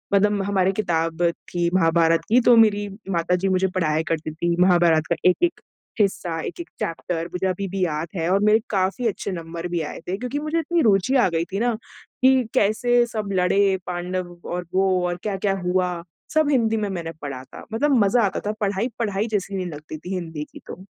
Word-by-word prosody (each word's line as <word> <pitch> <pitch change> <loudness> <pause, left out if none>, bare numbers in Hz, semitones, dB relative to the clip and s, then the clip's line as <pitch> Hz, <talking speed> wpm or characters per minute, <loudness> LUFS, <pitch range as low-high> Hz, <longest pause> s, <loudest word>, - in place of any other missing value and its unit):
मतलब 205 0 +3
हमारी 190 -1 +2
किताब 165 -4 -1 0.3
थी 175 -1 0
महाभारत 165 -1 +3
की 245 +3 +5
तो 240 0 +6
मेरी 205 -2 +4 0.2
माताजी 180 +2 +1
मुझे 190 0 +2
पढ़ाया 160 -3 +1
करती 155 -1 -2
थी। 170 +2 0
महाभारत 175 -3 +4
का 170 - +4
एक-एक 345 - 0 0.4
हिस्सा, 175 -4 0
एक-एक 345 - -6
चैप्टर 165 0 -3
मुझे 185 +1 -1
अभी 190 +1 -2
भी 190 0 -2
याद 155 +1 -2
है 165 0 -1
और 195 - +4
मेरे 215 +1 +5
काफ़ी 195 +5 0
अच्छे 200 -1 -3
नंबर 170 0 -5
भी 175 -2 -1
आए - - -8
थे 190 +2 -2
क्योंकि 250 +4 -3
मुझे 310 +2 -1
इतनी 335 +1 0
रुचि 205 +3 +3
आ 250 - +5
गयी 165 0 -1
थी 200 - 0
ना, 240 0 +1 0.5
कि 260 -1 +5
कैसे 240 +4 +3
सब 215 -3 -4
लड़े 190 +1 +3
पांडव 180 0 -4 0.2
और 180 0 -3
वो 190 +1 +3 0.2
और 175 0 -2
क्या-क्या 195 -1 0
हुआ, 180 -1 0 0.3
सब 310 -2 +4
हिंदी 225 -4 +2
में 210 -1 -1
मैंने 170 -4 -4
पढ़ा 135 -3 -6
था। - - -12
मतलब 280 +4 +2
मज़ा 235 +4 +3
आता 195 - -1
था 210 - +1
पढ़ाई, 200 +3 0
पढ़ाई 210 -1 -1
जैसी 200 -2 -2
नहीं 185 -1 -2
लगती 155 -1 -8
थी 180 +5 -7
हिंदी 160 -4 -4
की - - -10
तो। 185 - -9
190 Hz, 195 wpm, -23 LUFS, 170-215 Hz, 0.5 s, तो